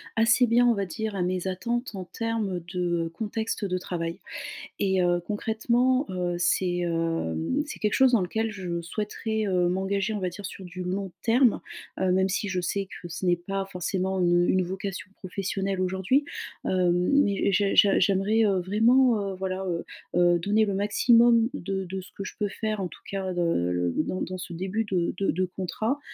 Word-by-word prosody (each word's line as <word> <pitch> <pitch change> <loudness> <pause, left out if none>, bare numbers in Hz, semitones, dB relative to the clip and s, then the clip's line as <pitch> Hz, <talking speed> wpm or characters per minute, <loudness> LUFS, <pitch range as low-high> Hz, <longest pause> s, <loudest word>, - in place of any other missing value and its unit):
assez 230 +2 +5
bien, 240 +1 +4
on 235 - +4
va 200 -1 -1
dire, 210 +5 -4
à 185 - 0
mes 180 +1 -1
attentes 235 +5 -2
en 190 - -4
termes 220 -3 -2
de 175 -2 -1
contexte 220 0 -2
de 185 -1 -1
travail. 170 0 -4 0.6
Et 190 -2 +2
heu, 175 0 +2
concrètement, 235 +5 +1
heu, 180 -1 -1
c'est, 175 0 +1
hem, 165 - -1
c'est 300 - -8
quelque 210 -1 +1
chose 265 -1 +5
dans 235 -5 +4
lequel 220 +5 -1
je 180 -4 -4
souhaiterais, 215 +4 -3
heu, 180 -2 +2
m'engager, 195 +3 0
on 210 - -2
va 185 -2 -1
dire, 195 +3 -8
sur 190 - -7
du 180 +1 -6
long 190 +1 -3
terme, 240 0 +4 0.4
heu, 190 -1 +2
même 190 +1 +2
si 200 +2 -1
je 185 -2 -1
sais 195 +3 -2
que 175 - -7
ce 170 +3 -5
n'est 175 -1 +4
pas 195 +3 -3
forcément 185 +2 -1
une 175 0 +3
une 185 - +3
vocation 190 +1 -5
professionnelle 195 0 -3
aujourd'hui. 190 +10 +1 0.4
Heu, 180 -2 +2
mais 200 +3 +2
j'ai 200 +1 +2
j'ai 200 -1 +6
j'aimerais, 200 +4 +3
heu, 195 -3 +2
vraiment, 220 +2 +3
heu, - - -4
voilà, 190 0 -3
heu, 170 -2 -2 0.3
heu, 175 0 +5
donner 210 +5 +2
le 200 -2 -1
maximum 230 +3 +4
de 190 -2 -3
de 190 +1 -5
ce 185 - -14
que 195 - -5
je - - -7
peux 205 -1 0
faire, 215 0 -3
en 185 - -1
tout - - -14
cas, 190 -2 -3
de 175 - -1
le 90 - +1
dans 185 - -3
dans 185 - -3
ce 180 0 -7
début 190 +6 -2
de 180 -4 0
de 200 - -3
de 185 -1 +1
contrat, 220 +8 -2
190 Hz, 195 wpm, -26 LUFS, 180-215 Hz, 0.6 s, j'ai